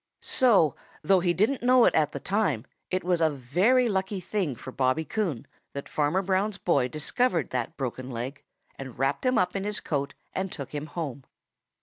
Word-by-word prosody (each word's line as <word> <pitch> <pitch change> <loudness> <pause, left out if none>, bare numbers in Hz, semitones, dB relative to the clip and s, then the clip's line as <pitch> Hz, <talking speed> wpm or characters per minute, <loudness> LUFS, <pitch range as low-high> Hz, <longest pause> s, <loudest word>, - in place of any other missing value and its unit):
So, 205 - +4 0.3
though 190 -1 +4
he 175 0 +2
didn't 215 +10 +1
know 250 0 +6
it - - +4
at 150 -2 +2
the - - -5
time, 185 - 0 0.2
it 185 0 -1
was 175 -1 +1
a 160 - +5
very 180 - +2
lucky 190 -1 -1
thing 185 - -2
for 130 - -9
Bobby 130 +5 +1
Coon 175 - -2 0.3
that 140 - -6
Farmer 155 +6 +1
Brown's 195 +2 0
boy 140 -10 +2
discovered 165 - 0
that 125 +5 -3
broken 130 -1 -4
leg 125 +3 -5 0.4
and 130 -3 -8
wrapped 135 - 0
him 255 -2 +3
up 180 +1 +1
in 195 - -1
his 210 0 -2
coat 140 -2 -3 0.2
and 190 -1 -2
took 140 -3 -7
him 150 +1 -4
home. 145 -4 -5
170 Hz, 190 wpm, -27 LUFS, 140-195 Hz, 0.4 s, know